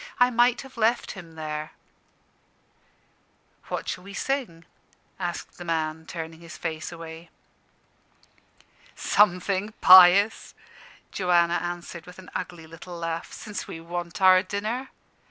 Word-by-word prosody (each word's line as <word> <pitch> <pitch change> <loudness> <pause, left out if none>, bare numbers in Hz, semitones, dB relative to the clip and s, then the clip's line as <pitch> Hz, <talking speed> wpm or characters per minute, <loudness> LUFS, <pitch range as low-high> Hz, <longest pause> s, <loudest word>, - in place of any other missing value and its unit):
I 250 0 +5
might 240 +1 +3
have 265 -2 -14
left 230 +2 +1
him 170 -4 -11
there." 155 0 -5 1.9
"What - - -4
shall 180 - -4
we 200 +1 -10
sing?" 230 -11 -3 0.5
asked 175 -1 -5
the - - -6
man, 160 -1 -2
turning 165 -1 -7
his 170 -1 -10
face 160 0 -4
away. 165 0 -10 1.7
"Something 200 +1 +2
pious," 185 +3 +7 0.6
Joanna 175 -2 +2
answered 175 -1 -6
with 180 - -12
an 190 -1 -13
ugly 175 -3 -5
little 165 +2 -10
laugh, 165 0 -4
"since 210 -2 -7
we 165 - -7
want 175 +2 -5
our 185 0 +7
dinner. 215 +7 -4
175 Hz, 120 wpm, -26 LUFS, 165-200 Hz, 1.9 s, pious